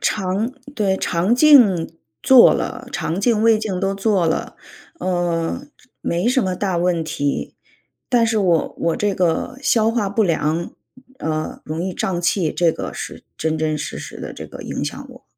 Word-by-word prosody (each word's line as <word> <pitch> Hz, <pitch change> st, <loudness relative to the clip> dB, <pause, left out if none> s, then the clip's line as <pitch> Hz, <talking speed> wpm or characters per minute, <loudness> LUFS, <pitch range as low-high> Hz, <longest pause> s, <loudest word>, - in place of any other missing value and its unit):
肠 200 Hz, +4 st, -1 dB, 0.2 s
对， 195 Hz, -3 st, +1 dB
肠 185 Hz, +7 st, +1 dB
镜 245 Hz, -, +5 dB, 0.3 s
做 260 Hz, -2 st, +8 dB
了， 255 Hz, 0 st, -4 dB
肠 170 Hz, +4 st, -2 dB
镜、 220 Hz, 0 st, +2 dB
胃 225 Hz, -1 st, +5 dB
镜 210 Hz, -4 st, -3 dB
都 195 Hz, +1 st, -1 dB
做 195 Hz, -3 st, +1 dB
了， 160 Hz, -, -2 dB, 0.4 s
呃， 175 Hz, +4 st, -1 dB, 0.2 s
这 -, -, -26 dB
没 175 Hz, +4 st, -1 dB
什 255 Hz, -1 st, +2 dB
么 185 Hz, -1 st, -1 dB
大 185 Hz, -3 st, -1 dB
问 175 Hz, -2 st, +1 dB
题， 145 Hz, -2 st, -2 dB, 0.5 s
但 240 Hz, -2 st, +3 dB
是 225 Hz, -1 st, +1 dB
我 175 Hz, -5 st, +1 dB
我 165 Hz, -1 st, 0 dB
这 205 Hz, -1 st, 0 dB
个 185 Hz, +8 st, -1 dB
消 225 Hz, -4 st, +3 dB
化 225 Hz, -4 st, 0 dB
不 215 Hz, +3 st, +1 dB
良， 165 Hz, -2 st, 0 dB, 0.5 s
呃， 155 Hz, 0 st, -3 dB
容 155 Hz, +2 st, -4 dB
易 185 Hz, 0 st, -3 dB
胀 175 Hz, -1 st, -2 dB
气， 175 Hz, -2 st, +1 dB
这 170 Hz, -2 st, +2 dB
个 -, -, -5 dB
是 -, -, -7 dB
真 160 Hz, 0 st, -1 dB
真 155 Hz, -1 st, 0 dB
实 150 Hz, -, -5 dB
实 -, -, -8 dB
的 -, -, -6 dB
这 -, -, -8 dB
个 -, -, -10 dB
影 -, -, -4 dB
响 -, -, -6 dB
我。 -, -, -15 dB
185 Hz, 190 characters per minute, -20 LUFS, 165-220 Hz, 0.5 s, 做